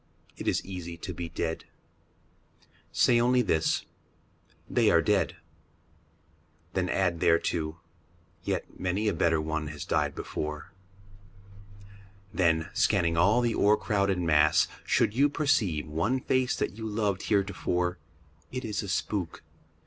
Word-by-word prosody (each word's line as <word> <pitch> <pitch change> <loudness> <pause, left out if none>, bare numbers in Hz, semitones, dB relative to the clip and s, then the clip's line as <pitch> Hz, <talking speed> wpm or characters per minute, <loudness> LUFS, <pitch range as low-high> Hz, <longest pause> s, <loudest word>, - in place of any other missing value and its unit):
It - - -7
is - - +1
easy 85 -3 -6
to 90 +2 -6
be 85 0 -5
dead. 80 0 -3 1.3
Say 120 -1 +4
only 125 +1 +3
this, 80 -7 +1 0.4
" - - -36
They - - +5
are 85 - +5
dead." 90 -2 +1 1.4
Then 90 -1 0
add 90 -3 +1
thereto, 80 -1 +1 0.3
" 85 -1 -35
Yet - - -4
many 95 +4 -1
a 105 - +2
better 80 -1 +2
one 80 0 -2
has 75 -1 -7
died - - 0
before." 75 -1 -5 1.6
Then, 80 -2 +2
scanning 85 -5 +2
all 105 +9 +4
the 120 -1 +1
o'ercrowded 100 -2 +2
mass, 75 -3 +4 0.2
should - - +2
you 140 +5 +3
Perceive 115 - +1
one 85 +12 0
face 130 0 +1
that 90 - -2
you 110 - -4
loved 105 -3 -1
heretofore, 95 -4 0 0.5
It 130 -1 -4
is 105 -2 -2
a 100 - -6
spook. 90 -1 -2
90 Hz, 135 wpm, -28 LUFS, 80-105 Hz, 1.6 s, They